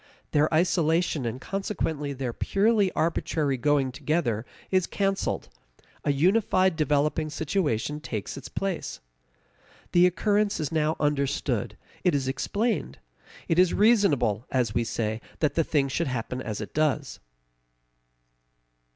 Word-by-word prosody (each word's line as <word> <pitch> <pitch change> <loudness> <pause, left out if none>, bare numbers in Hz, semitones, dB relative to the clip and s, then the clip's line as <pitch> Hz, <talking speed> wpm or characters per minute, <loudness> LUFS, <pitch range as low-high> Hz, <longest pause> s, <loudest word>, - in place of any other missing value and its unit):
Their 150 +1 +3
isolation, 165 -4 +2
and 115 +3 -4
consequently 160 -6 -3
their 130 -3 -3
purely 205 - +2
arbitrary 155 -3 0
going 140 0 +1
together, 130 -5 -1 0.2
is 185 -2 +2
canceled; 195 -1 -1 0.6
a - - +2
unified 185 +3 +3
developing 150 0 +1
situation 150 - -1
takes 110 -8 -5
its 140 - -8
place. 195 -3 -3 0.9
The 175 +1 +6
occurrence 205 +4 +1
is 155 -1 -2
now 155 0 +1
understood; 140 -6 0 0.3
it 180 -4 +3
is 135 -2 -1
explained; 200 - -1 0.5
it 165 - +2
is 180 -1 +4
reasonable, 195 - +3
as 120 -5 0
we 120 - +1
say, 110 0 -2 0.2
that 150 - +1
the 165 - +2
thing 145 -3 +1
should 155 +4 -1
happen 125 0 -3
as 110 -3 -4
it 105 - -7
does. 150 -2 0
150 Hz, 125 wpm, -26 LUFS, 130-180 Hz, 0.9 s, The